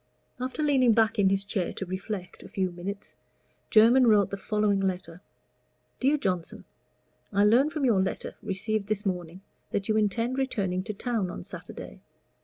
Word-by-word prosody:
After 260 +4 -3
leaning 260 -5 +4
back 225 0 +2
in 195 -1 +5
his 195 0 +1
chair 195 -3 -2
to 195 - -4
reflect 185 +1 -6
a - - -12
few 185 -2 -1
minutes, 190 +3 -7 0.5
Jermyn 235 +4 +6
wrote 210 -3 +4
the - - -1
following 210 0 +1
letter: 180 -3 -3 0.8
DEAR 280 +3 +3
JOHNSON, 185 - -3 0.7
I 200 0 +3
learn 240 +8 +5
from 305 -3 -1
your 215 -7 +4
letter, 190 - -3
received 200 +1 -2
this 210 -1 -1
morning, 180 -1 -3 0.3
that 200 +1 -2
you 215 - +3
intend 230 +5 0
returning 195 -9 -1
to 215 - -3
town 220 -4 -1
on 90 - -7
Saturday. - - -9
205 Hz, 165 wpm, -27 LUFS, 190-230 Hz, 0.8 s, Jermyn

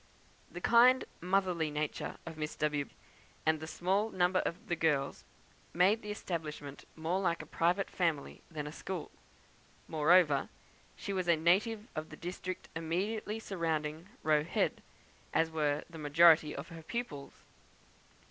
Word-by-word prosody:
The - - -8
kind 250 +2 +6 0.2
motherly 180 -3 +1
nature 150 0 -3
of 165 -1 -7
Miss 155 -1 -4
W, 150 -2 -1 0.6
and 160 0 +3
the 160 - -6
small 195 +6 0
number 185 -1 +2
of 170 - -3
the 175 - 0
girls, 150 -4 0 0.5
made 195 +6 +4
the 210 - -8
establishment 155 -8 -5
more 165 +4 -1
like 170 -3 0
a - - -11
private 180 +4 +1
family 165 -6 -1
than 150 -3 -5
a 150 - -5
school. 180 +1 -5 0.8
Moreover, 155 -2 +4 0.5
she 200 - -4
was 185 -2 -1
a 170 - +6
native 205 +7 +2
of 155 0 -4
the 155 - -10
district 180 +1 -5
immediately 205 +7 -2
surrounding 165 -4 -2
Roe 155 -1 +3
Head, 170 - 0 0.5
as 160 0 +3
were 150 -2 0
the 165 -2 -10
majority 155 +1 +5
of - - -7
her 165 -1 -9
pupils. 160 - -5
165 Hz, 145 wpm, -33 LUFS, 155-185 Hz, 0.8 s, kind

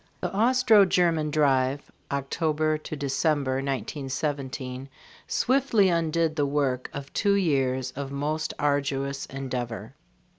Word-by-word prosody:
The - - -3
Austro 230 -1 +5
German 170 -4 +2
drive 140 -2 +1 0.2
(October 155 +2 0
December, 140 -2 -1
1917) 135 0 -3 0.4
swiftly 250 -7 +2
undid 165 -1 +1
the 145 -2 +1
work 140 -3 0
of 140 0 -8
two 200 -1 +2
years 130 -8 +1
of 135 +1 -6
most 150 +3 -2
arduous 140 -1 -1
endeavor. 125 -4 -5
140 Hz, 105 wpm, -26 LUFS, 135-160 Hz, 0.4 s, Austro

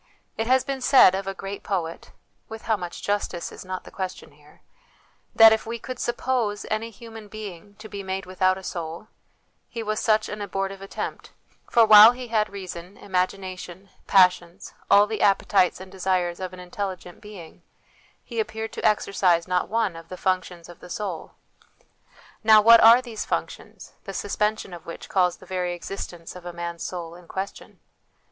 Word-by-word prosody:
It 225 - -2
has 260 +1 +4
been 275 -1 -4
said 250 -7 +7
of 195 0 -3
a 195 - -3
great 195 +1 -7
poet 170 -4 -4 0.4
with 220 0 -8
how 220 - +1
much 175 -3 -7
justice 200 -4 -2
is - - -10
not 185 0 -6
the - - -13
question 185 -1 -6
here - - -22 0.7
that 225 -1 +9
if 220 - -2
we 230 +1 -3
could 255 +2 -8
suppose 240 -3 -1
any 220 +1 -1
human 225 0 -12
being 205 -2 -9
to 215 +1 -11
be 200 -2 -7
made 190 0 -4
without 185 0 +1
a 190 - -10
soul, 170 +4 -6 0.6
he 230 - -5
was 215 0 -2
such 215 -1 +2
an 210 0 -6
abortive 195 -1 -4
attempt; 195 - -6 0.4
for 230 -1 +5
while 215 +2 +10
he 250 -1 -8
had 215 -2 +1
reason, 185 -1 -8
imagina 185 0 -2
tion, 185 +3 -11 0.2
passions, 180 -1 +3 0.2
all 205 +1 +7
the 215 -1 -4
appetites 195 -2 +3
and 190 0 -11
desires 185 -2 -1
of 185 -1 -5
an 185 - -11
intelligent 180 -1 -6
being, 200 -6 -12 0.6
he 235 -2 -6
appeared 220 0 -3
to - - -6
exercise 185 -5 +2
not 180 0 0
one 220 -5 0
of 165 0 -11
the 185 - -7
functions 185 -2 -2
of 175 - -13
the 180 - -13
soul. 185 -5 -5 1.1
Now, 220 0 +8
what 230 +2 +8
are 235 +3 +8
these 230 -4 -5
func - - -1
tions, - - -14
the 195 -2 -7
suspension 210 -1 -2
of 170 -1 -11
which 170 - -8
calls 180 -2 +2
the - - -16
very 180 -1 -2
existence 175 -2 -8
of 180 - -10
a 175 0 -7
man's 170 0 -6
soul 170 -2 -5
in 175 0 -15
question 190 +3 -7
195 Hz, 180 wpm, -24 LUFS, 180-215 Hz, 1.1 s, while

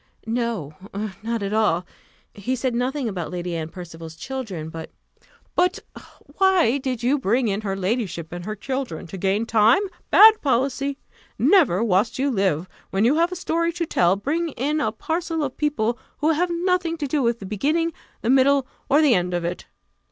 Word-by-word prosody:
"No, 225 - -2 0.5
not 230 -1 -2
at 200 +1 -2
all; 190 -5 +2 0.5
he 225 +6 -2
said 255 0 -1
nothing 255 +2 -1
about 180 -6 -4
Lady 175 -1 -4
Anne 160 -1 -4
Percival's 165 -2 -9
children, 195 -7 -5
but 160 0 -7 0.3
" - - -32
"But 360 +3 +2 0.6
why 380 -9 +4
then 275 +2 -1
did 255 -3 -3
you 275 +4 +2
bring 240 +2 +1
in 200 0 -1
her 195 -2 -2
ladyship 190 -4 -2
and 175 0 -6
her 215 +3 -4
children? 260 - -4
To 190 - -8
gain 195 +4 +1
time? 225 - +4 0.3
Bad 435 +1 +8
policy! 275 +1 0 0.4
Never, 275 - +4
whilst 220 +2 +1
you 275 +2 +1
live, 190 - 0 0.2
when 195 +3 +1
you 250 - +4
have 340 +2 +2
a - - -3
story 335 -1 0
to 340 0 -2
tell, 180 - +3
bring 315 +11 -1
in 295 +5 -1
a 215 - +1
parcel 325 +7 -2
of 265 -3 -3
people 240 -6 0 0.2
who 310 +2 +2
have 345 +3 +1
nothing 345 -1 0
to 300 - -3
do 285 +1 0
with 235 -2 +1
the 200 - -9
beginning, 310 - 0 0.3
the 235 - +2
middle, 270 0 +4 0.2
or 295 +3 +5
the 285 -5 +5
end 180 -2 +1
of 175 -1 -2
it. 175 +1 -4
240 Hz, 190 wpm, -23 LUFS, 195-295 Hz, 0.6 s, Bad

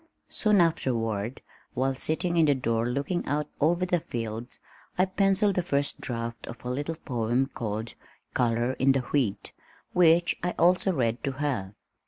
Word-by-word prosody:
Soon 210 -4 +3
afterward, 115 -8 0 0.3
while 135 +1 +1
sitting 160 +6 -1
in 165 -2 +4
the 145 - +4
door 115 -2 0
looking 140 +7 -1
out 150 +1 0
over 170 +4 +2
the 180 -1 +1
fields, 115 -3 -5 0.4
I 185 - +4
pencilled 195 +1 +2
the 180 - +1
first 140 -4 0
draft 115 -2 -5
of 120 - -9
a 125 - -2
little 145 +5 -2
poem 120 -3 0
called 110 -1 -4 0.4
Color 120 +1 +1
in 135 +1 +5
the 135 - +1
Wheat 125 -6 -1 0.4
which 170 0 +4
I 180 0 -2
also 180 +2 +4
read 120 -7 -1
to 135 - -1
her. 130 -9 -2
135 Hz, 160 wpm, -27 LUFS, 115-170 Hz, 0.4 s, in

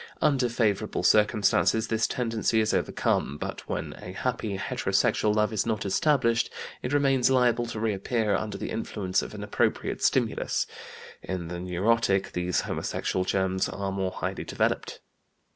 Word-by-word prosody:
Under 135 -5 +2
favorable 105 -6 0
circumstances 105 +1 +3
this 115 0 +1
tendency 115 -2 0
is 110 0 +1
overcome, 70 - 0
but - - -6
when - - -3
a 90 - -7
happy 110 -3 -2
heterosexual 105 +2 +1
love 105 +1 +2
is 105 - +1
not 110 -2 -2
established 115 +1 +2 0.3
it 125 - -3
remains 135 -3 +3
liable 125 -2 +3
to 115 -2 -5
reappear 110 +1 0
under 105 -2 -3
the - - -5
influence 95 -4 -1
of - - -7
an 100 - -6
appropriate 105 - -1
stimulus. - - +1 0.6
In 90 -3 -4
the 90 0 -5
neurotic 95 +3 +1
these 90 0 0
homosexual 95 - -2
germs 95 0 0
are 100 -1 -3
more 95 -1 -1
highly - - -4
developed. - - -1
105 Hz, 145 wpm, -27 LUFS, 95-115 Hz, 0.6 s, circumstances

